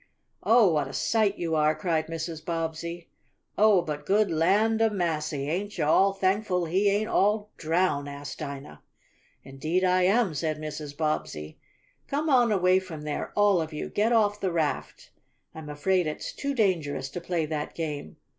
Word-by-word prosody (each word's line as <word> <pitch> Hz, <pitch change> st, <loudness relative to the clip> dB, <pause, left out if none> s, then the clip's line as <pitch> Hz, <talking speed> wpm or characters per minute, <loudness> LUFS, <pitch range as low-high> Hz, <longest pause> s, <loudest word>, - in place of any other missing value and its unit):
"Oh, 225 Hz, -6 st, +5 dB
what 150 Hz, -3 st, 0 dB
a -, -, -9 dB
sight 215 Hz, -3 st, +1 dB
you 165 Hz, -2 st, -2 dB
are!" 155 Hz, 0 st, +3 dB
cried 165 Hz, -4 st, -1 dB
Mrs. 165 Hz, -1 st, -5 dB
Bobbsey. 165 Hz, +1 st, -4 dB, 0.5 s
"Oh, 210 Hz, -4 st, +5 dB
but 150 Hz, -2 st, -5 dB
good 205 Hz, -1 st, +3 dB
land 210 Hz, +8 st, +2 dB
of 225 Hz, -1 st, +3 dB
massy! 155 Hz, -6 st, -2 dB
Ain't 195 Hz, +6 st, -3 dB
yo' 155 Hz, -, 0 dB
all 195 Hz, +5 st, +4 dB
thankful 190 Hz, -2 st, 0 dB
he 190 Hz, +5 st, +2 dB
ain't 205 Hz, +2 st, 0 dB
all 210 Hz, +1 st, +1 dB
drown?" 160 Hz, -3 st, 0 dB
asked 145 Hz, 0 st, -7 dB
Dinah. 140 Hz, -, -7 dB, 0.6 s
"Indeed 155 Hz, +7 st, -2 dB
I 185 Hz, 0 st, +3 dB
am," 195 Hz, 0 st, +3 dB
said 155 Hz, +1 st, -2 dB
Mrs. 150 Hz, -1 st, -7 dB
Bobbsey. 80 Hz, -, -3 dB, 0.5 s
"Come 300 Hz, +2 st, -1 dB
on 245 Hz, -3 st, +4 dB
away 185 Hz, -2 st, +4 dB
from 165 Hz, -5 st, -9 dB
there, 150 Hz, -1 st, -4 dB
all 205 Hz, -4 st, +4 dB
of 160 Hz, 0 st, -5 dB
you. 150 Hz, -, -4 dB
Get 215 Hz, +3 st, +1 dB
off 210 Hz, -3 st, +2 dB
the 190 Hz, -3 st, -1 dB
raft! 160 Hz, -3 st, -3 dB, 0.4 s
I'm 160 Hz, -2 st, -9 dB
afraid 175 Hz, +4 st, +1 dB
it's 155 Hz, -, -5 dB
too 280 Hz, 0 st, -3 dB
dangerous 165 Hz, -, 0 dB
to 175 Hz, +5 st, -6 dB
play 170 Hz, -2 st, -1 dB
that 150 Hz, -1 st, -4 dB
game. 150 Hz, -3 st, -5 dB
170 Hz, 170 wpm, -27 LUFS, 155-200 Hz, 0.6 s, Oh